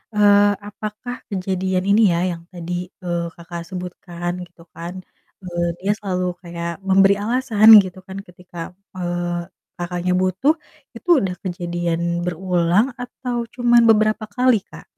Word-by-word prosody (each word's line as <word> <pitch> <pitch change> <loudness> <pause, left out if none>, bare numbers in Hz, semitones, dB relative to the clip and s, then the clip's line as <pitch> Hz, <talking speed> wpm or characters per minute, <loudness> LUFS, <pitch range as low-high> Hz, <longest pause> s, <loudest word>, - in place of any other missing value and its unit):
Eee, 205 0 +6 0.2
apakah 215 +4 -6
kejadian 185 -1 -1
ini 205 +3 +5
ya, - - +1 0.2
yang 165 0 -10
tadi, 175 0 -5 0.3
eee, 175 -1 -1
Kakak 170 0 -7
sebutkan 180 -1 -5
gitu 175 -1 -21
kan, 170 +1 -7 0.5
eee, 175 -1 -2
dia 195 +3 0
selalu 185 -3 -2 0.2
kayak 170 -1 -5
memberi 195 +1 +5
alasan 225 -2 +2 0.2
gitu 185 0 -8
kan 190 0 -7
ketika, 180 0 -15 0.4
eee, 175 -1 -2 0.3
Kakaknya 175 +1 -2
butuh, 185 - +2 0.4
itu 230 - -11
udah 185 -2 -2
kejadian 175 -2 -2 0.2
berulang 180 +3 +2
atau 245 0 -4 0.2
cuman 240 -1 +4
beberapa 215 0 +3
kali, 250 -3 +4
Kak? - - -12
185 Hz, 130 wpm, -21 LUFS, 175-210 Hz, 0.5 s, Eee